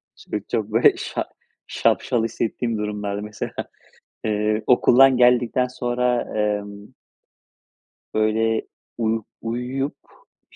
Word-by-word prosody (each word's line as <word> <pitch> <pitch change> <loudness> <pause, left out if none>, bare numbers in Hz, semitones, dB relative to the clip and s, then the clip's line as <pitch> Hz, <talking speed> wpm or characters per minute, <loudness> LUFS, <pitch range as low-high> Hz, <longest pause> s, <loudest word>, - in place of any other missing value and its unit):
Şimdi 105 - -5
çok, 110 -2 -1
böyle, 115 +3 +5
şa - - -3 0.4
şapşal 115 -2 +1
hissettiğim 115 0 -2
durumlarda 105 -1 -3
mesela. 105 0 -6 0.7
Eee, 105 0 0
okuldan 130 +1 +6
geldikten 125 0 +3
sonra 125 -1 0 0.2
emm 105 -1 -3 1.2
böyle, 110 +1 +1 0.3
uyu 115 -1 0 0.2
uyuyup, 125 +5 -3 0.6
i - - -20
115 Hz, 95 wpm, -22 LUFS, 105-125 Hz, 1.2 s, okuldan